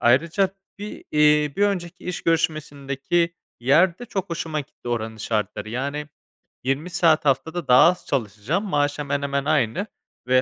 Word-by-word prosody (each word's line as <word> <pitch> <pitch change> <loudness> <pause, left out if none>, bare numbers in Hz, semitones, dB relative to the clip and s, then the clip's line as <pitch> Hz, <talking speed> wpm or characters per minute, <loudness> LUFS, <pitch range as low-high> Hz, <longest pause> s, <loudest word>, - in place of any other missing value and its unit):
Ayrıca 165 - +3 0.3
bir 210 +1 -7
eee, 150 -1 +4
bir 200 - +1
önceki 180 -4 -1
iş 180 -1 -4
görüşmesindeki 155 0 0 0.3
yer 170 +8 +4
de 245 - -7
çok 195 -6 -4
hoşuma 165 -2 -2
gitti. 140 -3 -11
Oranın 110 -2 -2
şartları. 110 -1 -2
Yani, 140 +5 -3 0.6
20 135 +7 -1
saat 165 -3 +3
haftada 150 +4 0
daha 125 0 +7
az 180 - -3
çalışacağım, 125 - -1
maaş 145 -5 0
hemen 145 -1 -1
hemen 140 0 -1
aynı 155 - +1 0.4
ve 130 0 +5
150 Hz, 150 wpm, -23 LUFS, 135-170 Hz, 0.6 s, daha